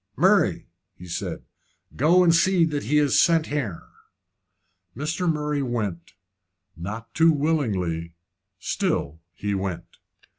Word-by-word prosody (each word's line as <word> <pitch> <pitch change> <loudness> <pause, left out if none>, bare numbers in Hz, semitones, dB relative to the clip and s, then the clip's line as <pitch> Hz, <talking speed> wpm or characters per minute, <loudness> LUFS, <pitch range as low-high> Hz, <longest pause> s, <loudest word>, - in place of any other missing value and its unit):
"Murray," - - +3 0.3
he 90 - -12
said, 85 +1 -5 0.5
"go 170 +7 +4
and 170 -2 +5
see 175 0 +4
that 150 -5 -3
he 150 +6 +2
is 145 -3 +4
sent 165 -2 +3
here." 130 - -3 1.1
Mr. 160 +5 -1
Murray 150 -1 -2
went, 105 -11 -3 0.6
not 105 +7 -7
too 165 0 +5
willingly 100 - -1 0.4
still 80 -3 -2
he 100 0 -3
went. 95 -3 -3
135 Hz, 115 wpm, -24 LUFS, 95-155 Hz, 1.1 s, and